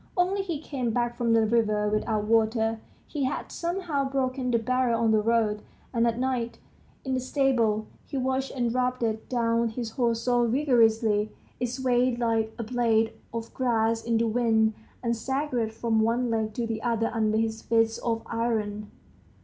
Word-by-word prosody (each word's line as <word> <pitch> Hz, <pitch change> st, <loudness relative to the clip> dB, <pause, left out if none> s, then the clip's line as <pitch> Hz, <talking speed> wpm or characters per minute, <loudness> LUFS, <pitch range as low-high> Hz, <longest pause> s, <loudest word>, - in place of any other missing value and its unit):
Only, 370 Hz, +3 st, +2 dB
he 345 Hz, -6 st, -3 dB
came 270 Hz, -5 st, -3 dB
back 240 Hz, +1 st, 0 dB
from 235 Hz, -1 st, +1 dB
the 225 Hz, -1 st, +4 dB
river 215 Hz, -2 st, +2 dB
without 215 Hz, 0 st, 0 dB
water, 225 Hz, 0 st, +2 dB, 0.3 s
he 285 Hz, -4 st, -2 dB
had 260 Hz, -, -3 dB
somehow 340 Hz, -6 st, -2 dB
broken 260 Hz, -1 st, -1 dB
the 235 Hz, -, +3 dB
barrel 245 Hz, 0 st, +1 dB
on 230 Hz, -1 st, +3 dB
the 215 Hz, -1 st, +4 dB
road; 215 Hz, -1 st, +1 dB, 0.3 s
and 235 Hz, -1 st, +2 dB
at 230 Hz, 0 st, 0 dB
night, 250 Hz, -2 st, -1 dB, 0.5 s
in 265 Hz, -, -1 dB
the 260 Hz, -, +1 dB
stable, 245 Hz, -5 st, +1 dB, 0.2 s
he 275 Hz, -, -4 dB
washed 265 Hz, +1 st, 0 dB
and 240 Hz, -3 st, 0 dB
rubbed 250 Hz, -1 st, 0 dB, 0.3 s
down 230 Hz, -1 st, +1 dB
his 225 Hz, 0 st, -5 dB
horse 230 Hz, -1 st, 0 dB
so 245 Hz, -1 st, +2 dB
vigorously, 225 Hz, -5 st, +3 dB, 0.3 s
it 245 Hz, -, 0 dB
swayed 250 Hz, 0 st, +1 dB
like 225 Hz, -2 st, 0 dB
a 235 Hz, -, -3 dB
blade 225 Hz, -1 st, +1 dB, 0.2 s
of 230 Hz, 0 st, -6 dB
grass 230 Hz, -3 st, +1 dB
in 230 Hz, -1 st, +1 dB
the 230 Hz, -, +2 dB
wind, 220 Hz, -1 st, +2 dB, 0.3 s
and 235 Hz, -1 st, +1 dB
staggered 260 Hz, -2 st, -1 dB
from 225 Hz, 0 st, 0 dB
one 235 Hz, +2 st, +1 dB
leg 220 Hz, -1 st, -1 dB
to 240 Hz, -, -1 dB
the 225 Hz, -1 st, -3 dB
other 230 Hz, -1 st, 0 dB
under 220 Hz, -1 st, +1 dB
his 225 Hz, 0 st, -1 dB
fists 225 Hz, 0 st, +1 dB
of 230 Hz, -1 st, -2 dB
iron. 215 Hz, -3 st, -2 dB
230 Hz, 175 wpm, -27 LUFS, 225-255 Hz, 0.5 s, the